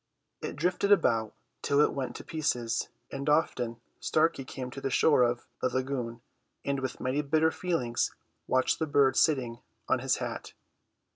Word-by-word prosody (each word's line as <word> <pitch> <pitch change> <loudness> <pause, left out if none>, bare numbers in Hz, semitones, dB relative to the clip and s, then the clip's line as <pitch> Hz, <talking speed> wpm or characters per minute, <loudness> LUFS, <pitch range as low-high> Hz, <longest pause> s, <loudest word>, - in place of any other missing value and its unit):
It - - -4
drifted 180 +5 +1
about 115 - +3 0.3
till 140 0 +2
it 150 - +4
went 135 -2 -3
to - - -7
pieces, 125 -8 -1 0.2
and 140 +2 -3
often 125 -6 +1 0.2
Starkey 160 -3 +1
came 130 -1 -6
to 135 - -7
the 135 - -1
shore 140 +1 +4
of 120 0 +1 0.2
the 130 - +2
lagoon, 125 -2 -3 0.4
and 140 -1 0
with 130 -1 -4
many 130 +3 0
bitter 155 +2 +2
feelings 130 -12 0 0.4
watched 130 0 +2
the 160 - 0
bird 140 -2 +4
sitting 125 -7 +2 0.3
on - - +2
his - - +1
hat. - - -5
135 Hz, 160 wpm, -29 LUFS, 125-155 Hz, 0.4 s, it